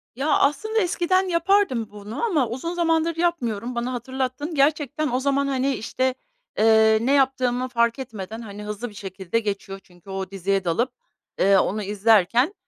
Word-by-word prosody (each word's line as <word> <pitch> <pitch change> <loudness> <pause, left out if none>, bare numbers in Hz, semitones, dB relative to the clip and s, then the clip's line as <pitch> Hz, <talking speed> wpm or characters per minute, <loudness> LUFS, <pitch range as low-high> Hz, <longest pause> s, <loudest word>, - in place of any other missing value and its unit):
Ya, 270 +5 -2
aslında 435 +11 +1
eskiden 370 +1 +1
yapardım 340 - +1
bunu 210 - -7
ama 310 - +1
uzun 265 +9 -4
zamandır 330 -1 +1
yapmıyorum. 250 -9 -1
Bana 240 +2 -2
hatırlattın. 260 +5 -3
Gerçekten 295 +1 +1
o 250 - +1
zaman, 280 +1 +1
hani, 270 0 0
işte, 255 +3 -1 0.4
ııı, 220 0 +5
ne 265 - +2
yaptığımı 255 -2 +1
fark 235 0 +1
etmeden, 225 -3 -7
hani, 210 -2 -8
hızlı 210 +3 -5
bir - - -15
şekilde 190 +1 -3
geçiyor 200 -2 -4
çünkü 175 +1 -19
o 190 0 -5
diziye 195 0 -1
dalıp, 230 +10 0 0.5
ııı, 195 0 +5
onu 210 +2 -2
izlerken, 215 - +3
245 Hz, 155 wpm, -23 LUFS, 210-285 Hz, 0.5 s, ııı